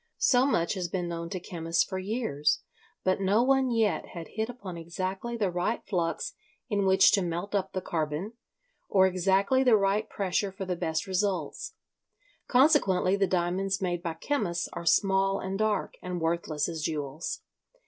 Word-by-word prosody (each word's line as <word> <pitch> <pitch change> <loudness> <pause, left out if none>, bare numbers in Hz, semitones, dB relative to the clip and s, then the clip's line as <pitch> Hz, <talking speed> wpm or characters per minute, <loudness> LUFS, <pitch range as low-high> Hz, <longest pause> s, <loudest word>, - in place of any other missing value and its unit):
So 255 +1 +4
much 170 -11 +1
has 185 -3 -2
been 175 0 -2
known 170 0 -4
to 185 - -4
chemists 165 -1 0
for 190 -1 -4
years, 185 - 0 0.4
but 185 +1 +1
no 200 +5 +3
one 265 0 +3
yet 225 -3 +1
had 170 -1 -7
hit 220 +1 -3
upon 205 -8 -7
exactly 185 +7 -4
the 200 -5 0
right 180 +6 -1
flux 185 - -1 0.4
in 200 -3 +1
which 190 0 +6
to 200 - +3
melt 175 +3 -3
up 195 -1 -1
the 185 - -2
carbon, 160 +6 -2 0.6
or 190 -1 +5
exactly 195 +7 +2
the 245 -4 +6
right 200 +2 +1
pressure 195 0 -1
for 190 0 -6
the 180 -1 -2
best 160 -1 -2
results. 195 - -2 0.7
Consequently 245 - +4
the 200 -1 +2
diamonds 185 +2 0
made 175 -2 -1
by 170 -2 -3
chemists 180 - -1
are 170 - -6
small 195 +1 +3
and 190 +1 -4
dark, 215 -1 0
and 180 -1 -4
worthless 165 -2 -1
as 165 -2 -4
jewels. 150 0 -3
190 Hz, 170 wpm, -28 LUFS, 170-205 Hz, 0.7 s, which